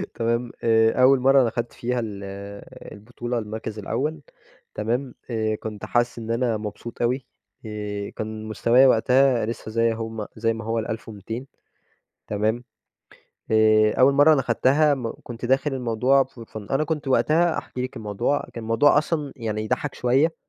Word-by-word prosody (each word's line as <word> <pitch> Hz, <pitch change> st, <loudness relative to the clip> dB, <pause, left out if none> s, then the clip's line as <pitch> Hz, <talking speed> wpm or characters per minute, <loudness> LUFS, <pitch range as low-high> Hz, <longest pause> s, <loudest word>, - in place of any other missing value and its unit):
تمام؟ 115 Hz, +1 st, -1 dB
آآ 115 Hz, +2 st, +3 dB
أول 135 Hz, +1 st, +6 dB
مرة 135 Hz, +2 st, +5 dB
أنا 120 Hz, -, +2 dB
أخَدت 120 Hz, +1 st, -4 dB
فيها 125 Hz, +1 st, -2 dB
ال 105 Hz, -4 st, -5 dB, 0.7 s
البطولة 120 Hz, +3 st, -5 dB
المركز 110 Hz, 0 st, -6 dB
الأول، 145 Hz, +9 st, -2 dB, 0.5 s
تمام؟ 120 Hz, +4 st, -2 dB
آآ 110 Hz, -2 st, 0 dB
كنت 105 Hz, -1 st, -7 dB
حاسس 120 Hz, 0 st, 0 dB
إن 115 Hz, 0 st, -5 dB
أنا 115 Hz, -1 st, 0 dB
مبسوط 105 Hz, +2 st, -7 dB
أوي، 125 Hz, +2 st, 0 dB, 0.4 s
آآ 105 Hz, -1 st, -5 dB
كان 110 Hz, 0 st, -6 dB
مستوايا 115 Hz, +4 st, +4 dB
وقتها 125 Hz, 0 st, +3 dB
لسه 110 Hz, -1 st, -5 dB
زي 115 Hz, +1 st, +2 dB
هم 110 Hz, -1 st, -5 dB
زي 115 Hz, +1 st, 0 dB
ما 115 Hz, 0 st, -7 dB
هو 115 Hz, +1 st, 0 dB
ال1200، 110 Hz, +2 st, -6 dB, 0.8 s
تمام؟ 110 Hz, +3 st, -1 dB, 0.9 s
آآ 110 Hz, -1 st, +5 dB
أول 130 Hz, +2 st, +6 dB
مرة 145 Hz, +3 st, +6 dB
أنا 140 Hz, -, +2 dB
أخدتها 135 Hz, +5 st, +3 dB
م 125 Hz, -4 st, -4 dB
كنت 120 Hz, 0 st, -7 dB
داخل 135 Hz, +3 st, +1 dB
الموضوع 125 Hz, +2 st, +2 dB
for 120 Hz, -3 st, -13 dB
fun 105 Hz, -2 st, -8 dB
أنا 135 Hz, +3 st, +2 dB
كنت 155 Hz, -3 st, -3 dB
وقتها، 160 Hz, +5 st, +3 dB
أحكي 125 Hz, -, -5 dB
لكِ 130 Hz, +1 st, -5 dB
الموضوع، 105 Hz, +6 st, -1 dB
كان 115 Hz, -, -6 dB
الموضوع 115 Hz, +7 st, +4 dB
أصلًا 150 Hz, -2 st, -1 dB
يعني 110 Hz, -4 st, -3 dB
يضَحَّك 140 Hz, +6 st, -2 dB
شوية، 135 Hz, +7 st, +2 dB
115 Hz, 160 wpm, -24 LUFS, 110-130 Hz, 0.9 s, أول